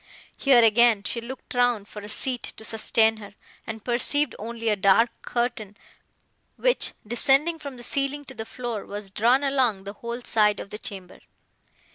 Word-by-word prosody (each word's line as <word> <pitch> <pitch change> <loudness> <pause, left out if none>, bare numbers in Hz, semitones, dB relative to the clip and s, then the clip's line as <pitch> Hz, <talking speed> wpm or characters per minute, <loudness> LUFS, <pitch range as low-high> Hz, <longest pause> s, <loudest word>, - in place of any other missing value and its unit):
Here 260 -4 +5
again 225 -1 +5
she 235 - -3
looked 255 +3 -9
round 245 -4 +1
for 210 - -9
a 205 - -9
seat 245 +3 -1 0.2
to 220 - -9
sustain 225 0 +2
her, 205 -1 -12 0.3
and 220 -1 -7
perceived 255 +3 +1
only 230 +1 -3
a 210 - +3
dark 200 +4 +4
curtain, 225 -4 -3 0.8
which, - - +1
descending 275 +8 +2
from 280 -4 -8
the 240 - -10
ceiling 280 +3 -1
to 265 - -10
the 220 -3 -7
floor, 240 -4 -5
was 205 -1 -7
drawn 240 +7 +3
along 255 -8 +1
the 200 +1 -7
whole 235 +3 -6
side 210 -3 +2
of 200 - -8
the 210 - -6
chamber. 190 -5 -8
235 Hz, 170 wpm, -25 LUFS, 210-255 Hz, 0.8 s, Here